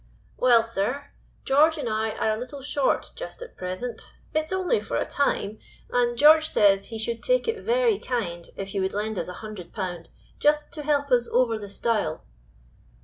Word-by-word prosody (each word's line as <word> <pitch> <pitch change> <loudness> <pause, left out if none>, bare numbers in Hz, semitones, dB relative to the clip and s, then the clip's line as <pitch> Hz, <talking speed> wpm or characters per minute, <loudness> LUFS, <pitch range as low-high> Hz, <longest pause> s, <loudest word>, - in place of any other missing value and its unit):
"Well, 240 -3 +5
sir. 230 +6 -3 0.3
George 310 +4 +4
and 280 -5 -3
I 220 0 -1
are 220 - 0
a 215 - -2
little 265 +3 -7
short 285 -1 0
just - - -7
at 475 - -12
present; 185 +7 -5 0.3
it 310 0 +1
is - - -9
only 375 +4 +1
for - - -3
a - - 0
time, 220 -6 -1 0.3
and 240 -1 +1
George 310 +3 +7
says 195 -1 +4
he 225 - -6
should 230 +1 -3
take - - +2
it 455 -1 -1
very 475 -3 +2
kind 175 -9 -3
if 195 0 -6
you 195 - 0
would 190 +1 -1
lend 215 0 -2
us - - -3
a 180 - -6
hundred 210 -5 -8
pound, 180 -5 -5 0.3
just 300 0 +2
to 305 - -5
help 285 -1 0
us 240 -1 +4
over 235 -3 +2
the 205 -1 -8
stile." 205 -7 -1
240 Hz, 195 wpm, -25 LUFS, 210-295 Hz, 0.3 s, George